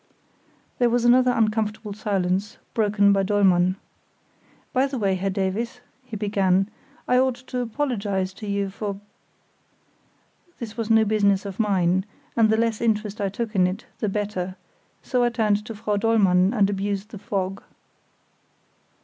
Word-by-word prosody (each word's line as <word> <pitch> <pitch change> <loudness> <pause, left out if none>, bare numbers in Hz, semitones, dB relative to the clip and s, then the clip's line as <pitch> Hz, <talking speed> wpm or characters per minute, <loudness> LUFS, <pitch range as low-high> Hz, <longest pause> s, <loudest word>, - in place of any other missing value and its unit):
There 245 -1 +4
was 240 0 +1
another 250 +1 +5
uncomfortable 215 -2 0
silence, 195 -1 -1 0.2
broken 205 -2 +3
by 195 - +2
Dollmann. 185 -2 +3 1.0
"By 265 +1 +3
the 270 -1 -4
way, 200 -4 +1
Herr 190 +1 -1
Davies," 200 +6 -2 0.2
he 250 -3 -8
began, 195 -1 +1 0.4
"I 250 - +4
ought 260 -1 +2
to 250 - -4
apologise 215 -7 -2
to 210 +2 -9
you 200 -1 -1
for——" 200 0 -5 1.6
This 225 -2 -7
was 230 -1 -3
no 220 -1 +5
business 200 -2 +2
of 195 0 -7
mine, 190 -3 +2 0.3
and 225 -2 +4
the 220 - +3
less 225 -1 0
interest 215 -2 0
I 200 - 0
took 220 +3 -4
in 185 -3 +4
it 190 +6 -5
the 215 - 0
better; 195 -3 -3 0.5
so 250 -2 +1
I 240 - +3
turned 215 -3 +1
to 225 - -6
Frau 210 -1 -1
Dollmann 200 -4 +3
and 210 -5 +3
abused 200 +1 -2
the 210 - -9
fog. 195 -1 -3
210 Hz, 150 wpm, -24 LUFS, 195-225 Hz, 1.6 s, another